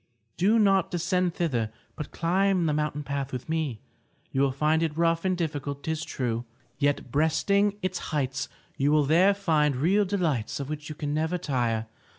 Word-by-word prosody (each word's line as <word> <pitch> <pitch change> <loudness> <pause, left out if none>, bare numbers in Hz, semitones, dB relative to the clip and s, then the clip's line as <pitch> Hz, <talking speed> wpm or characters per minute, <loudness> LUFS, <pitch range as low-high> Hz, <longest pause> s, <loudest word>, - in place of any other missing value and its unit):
Do 205 +6 +3
not 195 -4 +4
descend 180 0 0
thither, 120 -11 0 0.2
but 150 - -6
climb 185 +1 +1
the 155 - +1
mountain 150 -1 -1
path 140 -1 -3
with 125 -1 -5
me. 155 -8 -2 0.5
You 135 - +1
will 140 -1 +3
find 155 +4 +2
it 160 -2 -1
rough 165 +1 +2
and 185 -1 +1
difficult, 145 -4 -3
'tis 160 0 -2
true. 120 -5 -2 0.4
Yet, 145 -3 0
breasting 200 +8 +2
its 185 0 -1
heights, 135 -2 -1 0.3
you 140 +2 +2
will 150 -1 +4
there 180 +7 +5
find 155 -7 +2
real 190 +10 +3
delights 165 - -1
of 140 0 -4
which 150 0 -5
you 155 - -6
can 145 0 -3
never 160 +3 0
tire. 120 -8 -1
155 Hz, 175 wpm, -27 LUFS, 140-175 Hz, 0.5 s, there